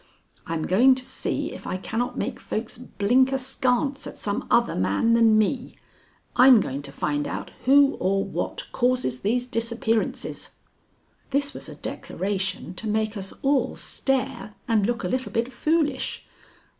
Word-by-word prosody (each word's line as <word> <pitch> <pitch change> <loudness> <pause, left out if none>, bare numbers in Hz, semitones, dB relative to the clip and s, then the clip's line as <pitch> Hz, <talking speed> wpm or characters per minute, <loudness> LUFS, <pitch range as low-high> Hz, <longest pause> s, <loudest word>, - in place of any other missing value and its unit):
I'm 165 -1 -2
going 250 +8 +5
to 255 0 -5
see - - -2
if - - -9
I 185 - -2
cannot 225 +5 -3
make - - -3
folks 220 +1 -4
blink 250 +3 +2
askance 265 +1 0
at - - -9
some 205 0 -3
other 235 0 +3
man 100 - +2
than 225 -2 +5
me. 245 +4 0 0.6
I'm 255 -2 +8
going 140 -7 -3
to 140 -1 -9
find 145 +1 -1
out - - -5
who 280 +2 +5
or 195 +1 +1
what - - -4
causes 245 - 0
these 245 +5 0
disappearances." 230 -2 -2 0.7
This 280 +1 +1
was - - -7
a - - -9
declaration 190 -2 -3
to 220 - -5
make 215 0 0
us 195 -2 -4
all 275 0 +2
stare 265 -5 -2
and 215 -4 +2
look 240 -1 -1
a - - 0
little 255 0 -2
bit 235 +3 -1
foolish. 305 +4 0
230 Hz, 155 wpm, -25 LUFS, 200-260 Hz, 0.7 s, I'm